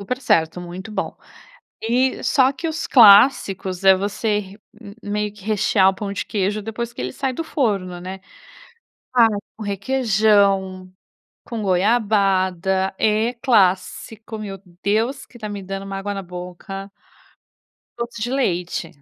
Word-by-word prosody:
Super 250 +6 -4
certo. 165 -8 +1
Muito 180 +4 -8
bom. - - -3 0.7
E 250 +4 0
só 265 -1 +3
que 330 +5 -4
os 320 +1 -3
clássicos 200 -5 +5
é 190 0 +7
você 205 +2 -1
re 195 0 -10 0.2
hum 200 -2 -10
hum 205 - -6
meio 210 0 -2
que 210 -2 -16
rechear 205 -2 +3
o 195 - -1
pão 200 0 -5
de 200 - -4
queijo 205 +1 -1
depois 230 +2 -5
que - - -7
ele 125 0 -3
sai 265 - -2
do 330 - -4
forno, 195 - -1
né? 190 +1 -7 0.9
Ah, 235 -2 +7 0.3
com 220 - -7
requeijão, 200 -4 +1 0.5
com 230 -3 -5
goiabada. 190 -2 +1
É 220 +3 +1
clássico. 220 -1 0
Meu 200 -2 -6 0.2
Deus, 220 +6 0
que 240 - -16
tá 215 -2 -6
me 200 -1 -6
dando 195 +1 -6
uma 195 0 -5
água 205 +1 -4
na 195 - -5
boca. 180 +2 -8 1.1
Doce 235 -1 -5
de 240 - -1
leite. 180 -8 -1
205 Hz, 150 wpm, -21 LUFS, 190-225 Hz, 1.1 s, é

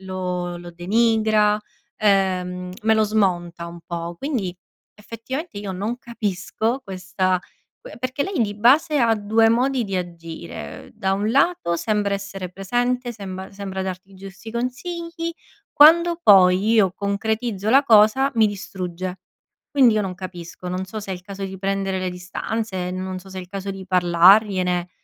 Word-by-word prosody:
lo 180 -2 -4
lo 175 0 -9
denigra, 215 +3 +2 0.4
ehm, 185 -3 +1
me 220 +1 +4
lo 220 - +3
smonta 175 -5 0
un 170 0 -10
po'. 170 0 -5
Quindi 205 - -3 0.4
effettivamente 230 +5 -6
io 205 -2 -5
non 210 +6 -3
capisco 225 +2 -2
questa 185 -1 -1 0.4
que - - -11
perché 255 +3 -2
lei 385 -5 -2
di 205 -2 -2
base 275 +8 +4
ha 230 -3 +4
2 220 +2 +3
modi 250 +3 +2
di 195 -2 -3
agire: 170 -2 -7
ehm, - - -16
da 195 -3 -1
un 205 +2 0
lato 275 - +2
sembra 205 +1 0
essere 195 -2 -6
presente, 245 +6 -1
sembra 190 -3 -7
sembra 195 -1 -5
darti 190 +1 -6
giusti 195 +3 -10
consigli, 335 +8 -4 0.4
quando 335 +3 +6
poi 190 - +6
io 195 -5 +4
concretizzo 210 +1 -2
la 270 +4 +6
cosa, 235 +3 +5
mi 220 - +5
distrugge. 185 -3 -5 0.5
Quindi 255 -6 +5
io 215 - +1
non 190 -2 -4
capisco. 180 -1 -8
Non 185 +1 -3
so 215 +3 -6
se 200 - -8
è - - -2
il 180 - -10
caso 200 0 -7
di 190 0 -6
prendere 195 0 -1
le 185 0 -2
distanze, 185 +1 -4
non 185 0 -4
so 195 - -14
se 190 - -7
è - - -3
il 180 - -10
caso 195 +1 -5
di 195 -1 -8
parlargliene, 180 0 +4
195 Hz, 160 wpm, -22 LUFS, 185-225 Hz, 0.5 s, quando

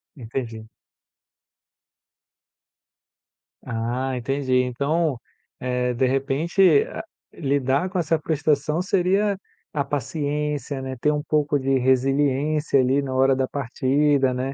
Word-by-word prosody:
Entendi. 115 -3 -6 3.0
Ah, 125 +3 -2
entendi 130 +2 -2
então, 140 +3 0 0.4
eh, 125 0 -1
de 130 +2 +1
repente 145 +5 +3
a 220 - -7 0.3
lidar 140 +3 0
com 185 -1 -2
essa 165 0 +1
frustração 155 0 0
seria 195 +2 +1 0.4
a 145 - 0
paciência, 145 -1 -3
né, 130 0 -5
ter 150 - +2
um 150 - -1
pouco 150 -1 +1
de 135 0 +1
resiliência 135 +3 +2
ali, 130 +2 +2
na 135 -2 -4
hora 135 +1 +3
da 130 -1 0
partida, 140 0 +1
né. 130 +2 -3
140 Hz, 110 wpm, -23 LUFS, 130-150 Hz, 3.0 s, repente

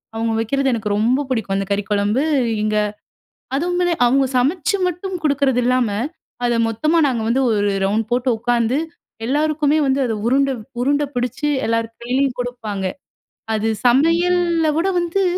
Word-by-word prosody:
அவுங்க 225 0 -1
வைக்கிறது 270 +4 0
எனக்கு 215 -2 -2
ரொம்ப 240 +6 +2
புடிக்கும். 220 -6 -1
அந்த 195 - -1
கறிக்குழம்பு, 205 +5 0 0.4
இங்க 215 0 0 0.8
அதுவுமே 355 +2 0
அவுங்க 270 +2 +3
சமச்சு 345 - +1
மட்டும் 360 +2 -3
குடுக்கிறதில்லாம, 255 -4 +2 0.6
அத 235 -1 +1
மொத்தமா 310 +9 +1
நாங்க 235 -4 -1
வந்து 255 +3 +2
ஒரு 205 -1 +1
ரவுண்ட் 215 +2 0
போட்டு 250 +1 +1
உக்கார்ந்து, 240 +2 +1 0.5
எல்லாருக்குமே 300 +2 +1
வந்து 270 +1 +1
அத 225 - -1
உருண்ட, 275 +2 +2 0.3
உருண்ட 285 +2 +2
பிடிச்சி 250 +4 -1 0.2
எல்லாரு 230 0 0
கையிலயும் 255 +1 0
குடுப்பாங்க. 220 -6 -4 0.7
அது 220 +1 0 0.2
சமையல்ல 335 +5 +3
விட 350 +4 +1
வந்து, 345 +3 0
255 Hz, 135 wpm, -20 LUFS, 225-300 Hz, 0.8 s, அவுங்க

